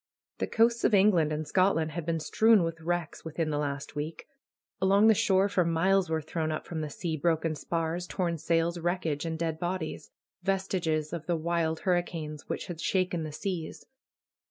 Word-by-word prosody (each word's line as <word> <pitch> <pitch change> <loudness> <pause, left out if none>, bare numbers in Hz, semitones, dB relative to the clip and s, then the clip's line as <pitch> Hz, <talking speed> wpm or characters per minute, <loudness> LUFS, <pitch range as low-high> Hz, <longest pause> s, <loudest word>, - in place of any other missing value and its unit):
The - - 0
coasts 235 +1 +2
of 215 - +4
England 185 -6 +4
and 155 0 -3
Scotland 185 -4 +2
had 170 0 -5
been 165 -1 0
strewn 220 +4 +4
with 165 0 -3
wrecks 175 -1 -2
within 160 0 -2
the 145 - 0
last 140 -1 -3
week. 150 +2 -5 0.6
Along 195 +2 +5
the 220 - +7
shore 195 -1 +3
for 195 -3 +2
miles 180 +2 +2
were 160 -1 -1
thrown 160 0 -2
up 155 - -4
from 160 -2 -4
the 155 - -3
sea 160 +2 -3
broken 160 +1 +1
spars, 165 +3 -2
torn 170 -3 -1
sails, 165 +2 +1
wreckage, 170 -3 -1
and 160 0 -3
dead 160 -1 -2
bodies; 175 -2 -3 0.3
vestiges 180 -5 -1
of 170 -1 -5
the 175 - +1
wild 160 0 -1
hurricanes 165 -5 -2
which - - -3
had 170 -2 -7
shaken 185 -3 0
the 155 -1 -4
seas. 170 +1 -5
165 Hz, 180 wpm, -29 LUFS, 160-185 Hz, 0.6 s, the